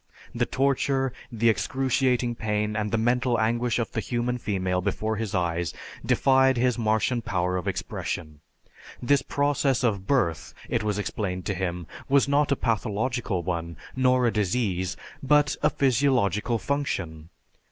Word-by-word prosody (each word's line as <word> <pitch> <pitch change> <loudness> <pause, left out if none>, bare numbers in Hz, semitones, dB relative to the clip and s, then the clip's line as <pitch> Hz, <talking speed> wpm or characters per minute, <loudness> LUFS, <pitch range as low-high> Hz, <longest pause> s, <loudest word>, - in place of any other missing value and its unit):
The - - 0
torture, 135 -1 +1 0.2
the 115 0 +1
excruciating 125 0 +1
pain, 105 -1 -1
and 105 -1 -1
the 115 - 0
mental 120 +1 +1
anguish 120 +2 +1
of 115 -3 -2
the - - -2
human 125 0 -2
female 95 -4 -1
before 110 +4 -1
his 110 -1 -3
eyes, 85 -1 -1 0.3
defied 130 -1 +3
his 125 0 +2
Martian 115 +2 +1
power 90 -5 -1
of 90 - -3
expression. 75 -3 -4 0.6
This 140 +2 +2
process 140 -2 0
of 100 -5 0
birth, 110 - 0
it - - 0
was 105 -1 -1
explained 95 -3 -3
to 100 - -1
him, 90 -2 -3 0.2
was 140 0 +4
not 145 +1 +2
a - - +4
pathological 115 -4 -1
one, 85 -2 -3 0.2
nor 130 -1 +3
a 115 - +2
disease, 95 -3 -1 0.2
but 145 +1 +3
a - - +4
physiological 125 -4 +1
function. 95 - -3
115 Hz, 145 wpm, -26 LUFS, 95-130 Hz, 0.6 s, was